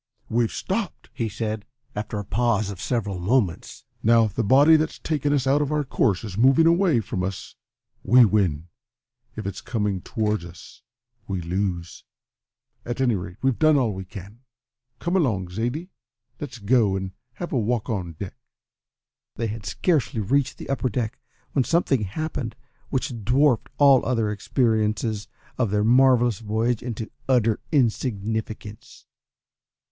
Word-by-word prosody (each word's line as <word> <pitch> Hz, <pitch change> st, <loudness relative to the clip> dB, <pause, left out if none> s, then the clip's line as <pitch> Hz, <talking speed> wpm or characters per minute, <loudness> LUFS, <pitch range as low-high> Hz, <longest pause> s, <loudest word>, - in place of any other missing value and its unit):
"We've 115 Hz, 0 st, +1 dB
stopped!" 195 Hz, -2 st, -4 dB
he 115 Hz, -2 st, -2 dB
said, 110 Hz, 0 st, -3 dB, 0.3 s
after 105 Hz, +1 st, -4 dB
a 105 Hz, -, -4 dB
pause 110 Hz, -1 st, +1 dB
of 95 Hz, -, -8 dB
several 105 Hz, -7 st, -2 dB
moments. 95 Hz, -2 st, -1 dB, 0.2 s
"Now, 115 Hz, 0 st, +5 dB
if 105 Hz, -, -4 dB
the 115 Hz, -, 0 dB
body 140 Hz, +9 st, +6 dB
that's 155 Hz, 0 st, 0 dB
taken 145 Hz, -2 st, -1 dB
us 140 Hz, -3 st, +1 dB
out 140 Hz, +2 st, +3 dB
of 145 Hz, 0 st, -1 dB
our 150 Hz, -1 st, +1 dB
course 115 Hz, -7 st, +1 dB
is 105 Hz, -2 st, -5 dB
moving 135 Hz, +6 st, +5 dB
away 170 Hz, -, +4 dB
from 95 Hz, -3 st, -4 dB
us 95 Hz, +1 st, -5 dB, 0.5 s
we 125 Hz, 0 st, +6 dB
win, 90 Hz, -7 st, +1 dB, 0.7 s
if 110 Hz, -, -6 dB
it's 100 Hz, -1 st, -4 dB
coming 105 Hz, -6 st, -2 dB
towards 105 Hz, -5 st, -1 dB
us 85 Hz, 0 st, -12 dB, 0.5 s
we 95 Hz, -2 st, -2 dB
lose. 85 Hz, -1 st, -3 dB, 0.8 s
At 120 Hz, +1 st, -4 dB
any 130 Hz, -3 st, +3 dB
rate, 90 Hz, -2 st, -5 dB
we've 135 Hz, -3 st, +1 dB
done 155 Hz, -1 st, +5 dB
all 120 Hz, -6 st, +1 dB
we 95 Hz, 0 st, -6 dB
can. 100 Hz, +3 st, -11 dB, 0.6 s
Come 175 Hz, +2 st, -2 dB
along, 110 Hz, -, +1 dB
Zaidie, 120 Hz, -, -3 dB, 0.5 s
let's 130 Hz, -4 st, -6 dB
go 110 Hz, -2 st, +2 dB
and 95 Hz, -1 st, -3 dB, 0.2 s
have 175 Hz, -, -6 dB
a 130 Hz, -, +2 dB
walk 115 Hz, 0 st, -1 dB
on 95 Hz, -7 st, -3 dB
deck." 90 Hz, +4 st, -7 dB, 1.0 s
They 115 Hz, -, -2 dB
had 105 Hz, -2 st, -5 dB
scarcely 140 Hz, -, 0 dB
reached 130 Hz, +6 st, +1 dB
the -, -, -8 dB
upper 130 Hz, -1 st, 0 dB
deck 115 Hz, 0 st, -3 dB, 0.3 s
when 135 Hz, -, +2 dB
something 135 Hz, -7 st, +1 dB
happened 120 Hz, 0 st, -4 dB, 0.3 s
which 130 Hz, -4 st, -3 dB
dwarfed 125 Hz, +3 st, +3 dB
all 140 Hz, -3 st, +6 dB
the -, -, -5 dB
other 115 Hz, -4 st, +1 dB
experiences 110 Hz, -1 st, 0 dB, 0.3 s
of 120 Hz, -4 st, +2 dB
their 105 Hz, +1 st, +1 dB
marvellous 120 Hz, -2 st, +4 dB
voyage 110 Hz, +2 st, 0 dB
into 115 Hz, -2 st, -5 dB, 0.2 s
utter 115 Hz, -4 st, +3 dB
insignificance. 110 Hz, -5 st, -2 dB
115 Hz, 155 wpm, -24 LUFS, 100-130 Hz, 1.0 s, body